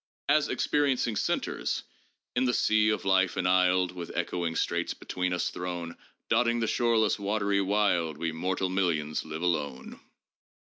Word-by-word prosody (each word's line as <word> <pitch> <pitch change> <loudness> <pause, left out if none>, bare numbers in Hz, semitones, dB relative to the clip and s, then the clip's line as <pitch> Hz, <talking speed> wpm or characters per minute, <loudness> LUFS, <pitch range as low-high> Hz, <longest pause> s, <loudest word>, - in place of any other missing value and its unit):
As 150 +1 +3
experiencing 135 -6 +1
centers, - - -1 0.2
— - - -37
" - - -61
in 125 +1 +2
the 125 -2 +1
sea 110 0 +3
of 105 - -1
life 95 -1 +2
enisled, 90 0 +3
With 90 -2 -7
echoing 85 -1 -2
straits - - -1
between 90 0 -3
us 90 - -1
thrown, 85 -2 -5 0.3
Dotting 120 +1 +2
the 115 - +1
shoreless 115 -2 +2
watery 100 0 0
wild, 95 -6 +1
We 85 +1 -2
mortal 95 +3 -1
millions 85 -5 0
live 80 +2 -6
alone." 70 -7 -2
95 Hz, 150 wpm, -28 LUFS, 85-110 Hz, 0.3 s, As